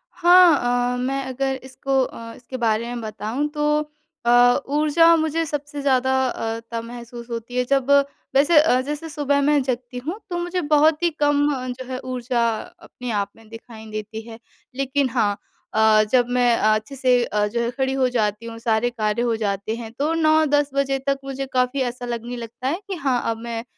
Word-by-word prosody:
हाँ, 285 -9 +5
अ, - - -3
मैं 265 +2 -1
अगर 265 +1 -2
इसको 265 +1 -1
अ, 230 -2 -7
इसके 255 +1 -8
बारे 230 -1 +1
में 240 0 -5
बताऊँ 220 +6 -3
तो 300 0 +1 0.5
अ, - - +2 0.5
ऊर्जा 330 +3 +5
मुझे 320 0 0
सबसे 290 -1 -5
ज़्यादा 260 -1 +2
अ, 225 -2 -3
तब 230 0 -3
महसूस 235 0 -9
होती 235 +1 -6
है 250 - +3
जब 275 0 +1 0.5
वैसे 290 +4 +5
अ, 295 -5 +3
जैसे 295 +4 -5
सुबह 285 -2 0
मैं 290 0 +3
जगती 250 -1 -4
हूँ 375 +6 -3
तो 350 - -2
मुझे 350 +1 -2
बहुत 305 +2 +3
ही 345 - +4
कम 290 0 +3
अ, 255 0 -5
जो 255 +1 -6
है 255 - -3
ऊर्जा 250 -2 -1 0.3
अपने 245 -2 -8
आप 200 -1 -1
में 225 -1 -19
दिखाई 225 -1 -11
देती 215 +1 -6
है। 225 0 -10 0.4
लेकिन 275 0 0
हाँ 225 -4 +1 0.4
अ, 215 0 +5
जब 245 -2 +4
मैं 245 -1 +4
अच्छे 215 +5 +1
से 250 -2 +3
अ, 210 -1 0
जो 235 +3 -2
है 235 - 0
खड़ी 265 +1 -1
हो 260 -1 +2
जाती 215 -2 -1
हूँ, 230 0 -7
सारे 230 0 +1
कार्य 215 -2 -1
हो 235 -1 +1
जाते 205 0 -2
हैं 230 -1 -8
तो 305 +3 +1
9-10 310 -3 +3
बजे 275 -1 0
तक 275 0 +2
मुझे 270 0 -4
काफ़ी 255 +1 +1
ऐसा 245 0 -9
लगने 240 0 -4
लगता 235 +2 -6
है 330 +6 -1
कि 390 - -3
हाँ, 270 -7 0
अब 225 - -4
मैं 230 0 -5
255 Hz, 195 wpm, -22 LUFS, 230-285 Hz, 0.5 s, हाँ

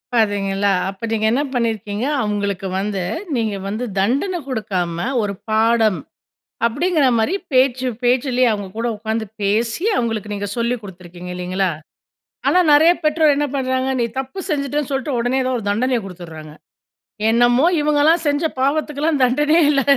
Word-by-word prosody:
பார்த்தீங்களா, 200 -2 +1 0.2
அப்ப 195 +4 -6
நீங்க 220 -1 0
என்ன 255 +5 +2
பண்ணியிருக்கீங்க 225 -2 -1 0.2
அவுங்களுக்கு 200 -2 -2
வந்து, 200 -1 -2 0.3
நீங்க 220 -4 -1
வந்து 215 +5 -3
தண்டனை 275 - +1
குடுக்காம, 190 -9 -2 0.3
"ஒரு 200 -1 -2 0.2
பாடம்", 220 -1 +3 0.7
அப்பிடீங்கிற 300 +6 +1
மாரி 260 - +1 0.2
பேச்சு 255 0 +3 0.2
பேச்சிலேயே 250 0 +2
அவுங்க 205 -2 -3
கூட 230 +1 -1
உட்காந்து 220 +1 -2 0.2
பேசி, 225 - 0
அவுங்களுக்கு 220 -3 -2
நீங்க 205 0 -3
சொல்லி 235 +1 +1
குடுத்துருக்கீங்க, 180 -2 -10
இல்லைங்களா? 180 +1 -1 0.8
ஆனா 360 - +4
நெறைய 315 +4 +7
பெற்றோர் 305 -1 +4
என்ன 295 +1 +1
பண்ணுறாங்க, 260 0 0
நீ - - +2
தப்பு 265 +7 -5
செஞ்சுட்டேன்னு 290 -1 -1
சொல்லிட்டு, 270 0 -1
உடனே 245 +3 +1
ஏதோ 255 0 0
ஒரு 225 - -7
தண்டனைய 245 +4 +1
குடுத்துடுறாங்க. 165 -4 -10 0.8
என்னமோ 240 +5 +4
இவங்கள்லாம் 300 +3 +3
செஞ்ச 290 +3 0 0.2
பாவத்துக்குல்லாம் 295 +2 0
தண்டனையே 295 +6 +3
இல்ல. 275 -1 +2
235 Hz, 140 wpm, -19 LUFS, 205-275 Hz, 0.8 s, நெறைய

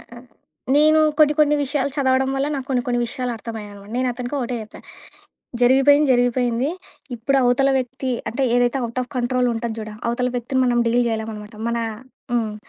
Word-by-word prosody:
ఆహ్, - - -19
ఆహ్, 250 +1 -13 0.5
నేను 310 +1 +5 0.2
కొన్ని, 300 -1 +5
కొన్ని 295 0 +4
విషయాలు 280 0 -1
చదవడం 265 -1 +2
వల్ల 275 +1 0
నాకు 265 -1 -5
కొన్ని, 250 -2 +1
కొన్ని 245 0 +1
విషయాలు 250 +1 -3
అర్థమయ్యాయనమాట. 210 -3 -9
నేనతనికి 250 +1 -2
ఒకటే 245 0 -3
చెప్పా. 215 - -12 0.8
జరిగిపోయింది 270 +3 +5
జరిగిపోయింది. 245 +2 +1 0.5
ఇప్పుడు 275 +5 0
అవతల 270 +3 +3
వ్యక్తి, 260 +1 -4 0.2
అంటే 265 +4 -1
ఏదైతే 245 +2 +2
అవుట్ 235 +2 -3
ఆఫ్ 245 - -10
కంట్రోల్ 250 0 +1
ఉంటాం 225 -1 -3
చూడా 215 0 -7
అవతల 250 +1 0
వ్యక్తిని 260 +2 -1
మనం 240 -1 +2
డీల్ 245 +1 +2
జేయలేం 220 0 -3
అనమాట. 210 +1 -10
మన 235 0 -1 0.5
హ్మ్. 220 -3 0
245 Hz, 170 wpm, -21 LUFS, 235-265 Hz, 0.8 s, నేను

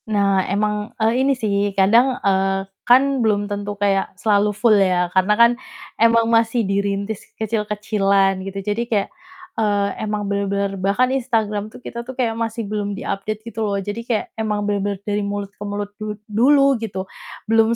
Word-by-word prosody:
Nah 200 -2 +2
emang, 210 +1 -1
eee, 225 +3 +2
ini 275 +1 +3
sih 215 -5 -1 0.2
kadang, 235 +7 +4
eee, 195 0 +1 0.2
kan 265 +1 +5
belum 210 -2 +1
tentu 205 0 -4
kayak 195 -2 0
selalu 205 +1 +2
full 230 -1 +4
ya 185 -3 +3
karena 190 +3 +3
kan 235 0 +7 0.5
emang 230 0 +5
masih 230 0 +2
dirintis 200 +1 -1 0.2
kecil-kecilan 205 -3 +1
gitu. 195 +1 -5
Jadi 210 +2 -1
kayak, 205 -3 0 0.5
eee, 205 -2 +1
emang 210 -1 -2
bener-bener 200 0 -1
bahkan 235 +7 +2
Instagram 220 -5 -1
tuh - - -13
kita 235 - -5
tuh 250 +2 -9
kayak 240 -3 +1
masih 225 0 -3
belum 205 -1 -3
di-update 215 +2 -4
gitu 225 - -7
loh 200 -1 -1
jadi 205 +3 -4
kayak 225 -3 0
emang 210 -1 -1
bener-bener 205 -1 -1
dari 205 0 -1
mulut 200 0 -4
ke 205 - -10
mulut 205 0 -4
du 215 0 -4 0.2
dulu 275 +3 +4
gitu 190 -4 -4 0.4
belum 225 +1 +3
210 Hz, 165 wpm, -20 LUFS, 200-225 Hz, 0.5 s, kan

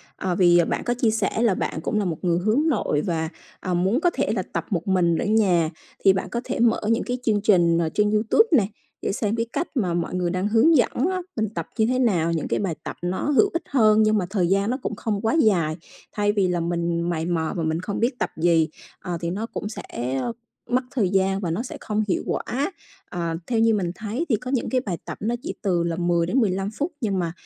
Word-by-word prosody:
ờ, 185 -2 -2
vì 175 -2 +5
bạn - - -1
có 240 - 0
chia 235 -3 +1
sẻ 220 +1 0
là 225 -5 +4
bạn 160 - -3
cũng 210 +4 -1
là 200 - 0
một 165 -3 -2
người 175 -1 +2
hướng 220 - +2
nội 205 - +1
và, 160 -2 -2 0.3
ờ, 185 - -3
muốn 190 +9 +2
có 350 - +4
thể - - 0
là - - 0
tập - - -2
một 180 -3 -2
mình 175 -3 +2
ở - - -1
nhà. 190 -7 +3 0.3
Thì 195 - +7
bạn 190 - -3
có 235 - -2
thể - - -3
mở 235 -1 +3
những 230 - +1
cái 250 0 -2
chương 210 -4 +2
trình, 170 -5 +4
ờ, 165 -1 +1
trên 210 0 +2
YouTube 220 - +3
nè 200 -5 +2 0.3
để - - -1
xem 210 +2 -1
cái 230 - 0
cách 330 +5 -1
mà 185 -9 0
mọi 170 0 -2
người 180 -1 0
đang 185 +3 -1
hướng 230 +9 +5
dẫn 245 - +3 0.2
á, 370 - -2
mình 220 -3 -1
tập - - -3
như 220 - +3
thế 255 +2 +1
nào, 175 -9 +2
những 160 - -2
cái - - 0
bài 190 -5 -1
tập - - -5
nó 180 +2 -2
hữu 390 +8 +4
ích 335 - -2
hơn 220 -5 +4
nhưng 215 0 +3
mà 185 - 0
thời 190 -4 +1
gian 195 +3 +2
nó 255 - 0
cũng 220 - -3
không 205 -1 -2
quá 225 0 +1
dài. 170 -8 +2 0.4
Thay 205 0 +1
vì 200 -3 +1
là 180 -1 0
mình 170 0 -1
mày 160 -2 -1
mò 165 -2 -1
và 165 - -1
mình 160 +1 0
không 200 +1 -4
biết 245 +2 0
tập - - -1
gì, 165 -1 +3 0.3
à, 175 -1 -4
thì 170 - -2
nó 210 +4 -3
cũng 225 - -6
sẽ 215 - -7 0.9
mất 255 +1 +2
thời 215 -8 +1
gian 195 0 +1
và 175 -5 -2
nó 210 +9 -2
sẽ - - -7
không 215 0 -1
hiệu 185 - 0
quả. 275 +9 -2 0.4
Ờ, 170 -2 -3
theo 235 -2 +1
như 225 0 +4
mình 180 -5 0
thấy 225 +10 -3
thì 225 - +4
có 250 +4 -5
những 255 - 0
cái 255 -1 +1
bài 190 -8 -3
tập - - -6
nó 230 +4 0
chỉ - - -4
từ 180 -4 +1
là 170 -1 -1
10 170 -1 +1
đến 245 +10 +1
15 195 -3 0
phút 295 +9 -3
nhưng 200 -4 0
mà 170 -2 -1
200 Hz, 260 wpm, -24 LUFS, 175-225 Hz, 0.9 s, Thì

